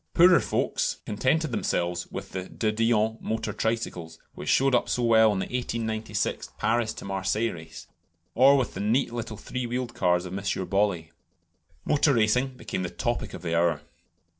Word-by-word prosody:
Poorer 180 0 +7
folks - - -1
contented 130 +8 0
themselves 85 -5 -1
with - - -7
De 95 +4 -2
Dion 110 0 +1
motor 110 0 -3
tricycles, 90 -8 -3 0.2
which - - -6
showed 135 0 +3
up 120 - +2
so 125 - 0
well 110 -2 +5
in 100 - -1
the 95 - -1
1896 110 -4 -2
Paris 115 -1 0
Marseilles 100 +4 -1
race; 80 -2 -11 0.5
or 135 +3 +6
with 130 - -1
the - - -6
neat 115 +5 +1
little 115 -2 -5
three 125 +3 -4
wheeled 120 0 -3
cars 90 -3 +1
of 90 +1 -6
M. 100 - -4
Bollée. 95 -3 0 0.8
Motor 145 -1 +3
racing 115 +4 +3
became - - -4
the 90 - -2
topic 120 +4 -3
of - - -10
the 85 -1 -1
hour. 85 0 +2
110 Hz, 165 wpm, -26 LUFS, 95-120 Hz, 0.8 s, Poorer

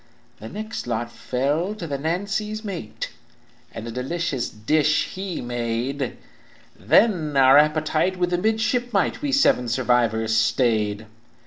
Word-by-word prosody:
"The 110 - -8
next 215 - -6
lot 120 0 -2
fell 145 - -1
to 185 - -6
the 140 -3 -3
Nancy's 205 +7 -2
mate, 175 - -5 0.6
And 115 - -7
a - - -5
delicate 135 +2 -2
dish 155 +2 +2
he 190 -2 -5
made; 120 +3 -3 0.6
Then 155 - +2
our 135 +1 +7
appetite 155 +4 +1
with 180 0 0
the 175 - +1
midshipmite 220 +1 0
We 290 -1 -1
seven 275 - +3
survivors 115 -2 +1
stayed. 110 -2 +1
150 Hz, 125 wpm, -23 LUFS, 120-190 Hz, 0.6 s, our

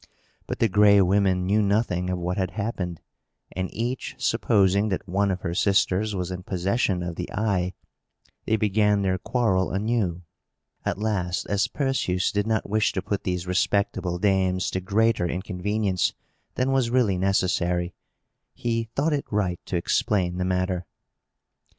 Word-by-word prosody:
But - - -3
the 115 - +3
Gray 100 0 +5
Women 95 -1 +3
knew 105 +3 +3
nothing 100 -3 +1
of 90 - -1
what 90 +1 -2
had 95 -2 0
happened; 95 -6 -3 0.5
and, 95 +1 -3
each 120 +3 -3
supposing 100 +1 +2
that 95 - -3
one 100 +2 +1
of 95 -2 -2
her 85 - -3
sisters 100 +2 +2
was 90 -1 -3
in 90 0 -5
possession 95 0 0
of 85 -1 -5
the 90 - -5
eye, 95 -4 0 0.7
they 110 - +3
began 105 -1 +2
their 95 -1 0
quarrel 95 -5 +1
anew. 100 -4 -1 0.6
At - - -1
last, 95 -4 -1
as 100 +1 +2
Perseus 135 -10 0
did 105 +1 -1
not 110 -1 0
wish 110 +1 +1
to 95 - -1
put 100 0 -3
these 90 -1 -2
respectable 90 -1 0
dames 95 -1 +1
to 95 - -2
greater 105 0 +2
inconvenience 95 +2 -1 0.4
than 130 +1 +1
was 130 -3 +2
really 115 -7 +2
necessary, 90 -2 +1 0.6
he 115 -1 -1
thought 150 +3 +1
it 145 - -1
right 95 -4 0
to - - -3
explain 90 0 0
the - - 0
matter. 90 -2 -1
95 Hz, 155 wpm, -25 LUFS, 90-105 Hz, 0.7 s, Gray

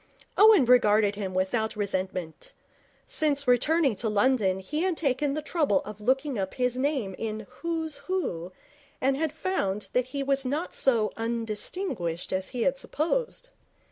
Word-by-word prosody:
Owen 415 - +7
regarded 215 -4 +4
him 195 -2 -5
without 220 +5 0
resentment. 190 - -4 0.5
Since 285 -3 0
returning 275 +3 +3
to 220 +2 -1
London 210 -3 +2
he 295 +12 -3
had 365 -2 0
taken 280 -1 0
the 305 - -3
trouble 300 -3 +1
of 210 0 -9
looking 265 +2 0
up 190 -1 -3
his 250 -1 0
name 260 -7 -1
in 220 -1 -4 0.2
Who's 325 -2 -2
Who 185 - -2 0.5
and 270 +1 +2
had 310 +1 -1
found 210 - -2
that 250 0 +2
he 275 +2 -4
was 275 0 +1
not 290 +7 -2
so 230 -5 +2
undistinguished 225 - -3
as 190 0 -1
he 245 -3 -3
had 275 0 +1
supposed. 485 - -2
255 Hz, 150 wpm, -27 LUFS, 210-300 Hz, 0.5 s, Owen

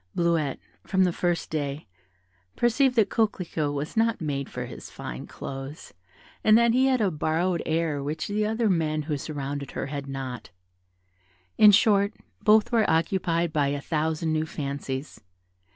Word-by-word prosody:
Bleuette, 165 -5 +1 0.3
from 190 -1 +2
the 180 -2 +2
first 175 -1 -1
day, 145 -1 -3 0.7
perceived 250 +2 +2
that 220 -4 +3
Coquelicot 180 -9 0
was 145 +6 -4
not 225 0 +2
made 140 -4 -3
for - - -5
his - - -9
fine - - -7
clothes, 135 +2 -8 0.5
and 215 0 +6
that 235 0 +4
he 260 +2 +4
had 260 -3 +2
a 200 -3 +2
borrowed 165 +3 0
air 160 -3 0
which 150 +3 -3
the 210 +1 0
other 220 +2 -1
young 185 -5 +3
men 155 -1 -1
who 150 0 -2
surrounded 140 -1 -5
her - - -2
had 140 0 -5
not: 135 -3 -6 1.1
in 210 -1 +8
short, 205 0 +4 0.3
both 215 +2 +4
were 225 -2 +3
occupied 170 0 +1
by 145 -3 +2
a 140 0 -1
thousand 160 +1 -1
new 155 0 0
fancies. 140 -1 -5
160 Hz, 160 wpm, -26 LUFS, 145-205 Hz, 1.1 s, in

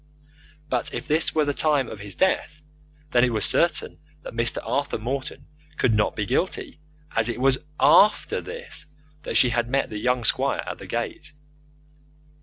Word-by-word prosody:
But 125 -5 -1
if - - -5
this 155 +2 +2
were 155 -1 +3
the 145 - 0
time 145 -4 +2
of 110 - -8
his 100 -1 -7
death, 155 -5 0 0.5
then 120 - +4
it 125 - +3
was 110 -3 0
certain 170 -2 +1 0.2
that - - -8
Mr. 115 0 +1
Arthur 140 0 -1
Morton 130 +5 -5 0.3
could 115 - +2
not 105 -1 +1
be 105 - -2
guilty, 150 - -2 0.4
as 115 +1 +3
it 120 - -3
was 135 0 +3 0.2
AFTER 210 +1 +4
this 480 - -4 0.3
that - - -1
she 125 - +6
had 120 0 -1
met 135 -1 0
the 105 - -4
young 125 +1 0
squire - - +1
at - - -6
the - - -10
gate. - - -4
130 Hz, 175 wpm, -24 LUFS, 115-150 Hz, 0.5 s, she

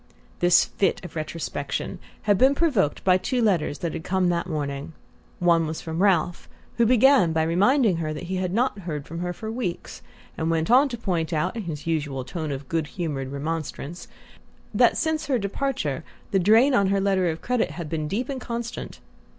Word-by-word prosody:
This 175 0 +5
fit 190 -1 -1
of 175 - -10
retrospection 155 -2 -4 0.2
had 205 -1 +4
been 265 +7 +4
provoked 260 - +1
by 185 -1 +4
two 250 +7 -1
letters 180 -10 +1
which 170 - -1
had - - -5
come 185 -1 +1
that 170 0 -1
morning. 145 -1 -4 0.4
One 170 -2 +3
was 155 +1 -4
from 160 +2 -4
Ralph, 180 -3 +1 0.3
who 235 -1 +4
began 250 - +5
by 160 0 +2
reminding 200 - +3
her 155 -2 -2
that 155 - -5
he 185 +2 -3
had 185 -1 -1
not 230 +1 0
heard 155 -6 -5
from 165 +1 -6
her 180 0 -2
for 220 +4 -6
weeks, 225 -8 -4 0.4
and 160 0 0
went 165 +3 0
on 270 +3 +6
to 240 - -5
point 175 -7 -1
out, 180 +7 0
in 225 -4 -4
his 150 -3 -5
usual 145 -5 -1
tone 160 -1 -4
of 135 0 -5
good 160 0 -1
humoured 145 -6 -4
remonstrance, 155 +2 -5 0.7
that - - +4
since 315 -3 -1
her 270 -3 +2
departure 200 - -2 0.3
the 195 - +3
drain 225 +9 +5
on 200 -5 +4
her 195 +1 +2
letter 190 -2 +2
of 160 0 -5
credit 250 -2 +1
had 170 -3 -6
been 155 -1 -2
deep 225 +9 -2
and 270 -2 -4
constant. 235 0 -5
175 Hz, 195 wpm, -25 LUFS, 160-220 Hz, 0.7 s, on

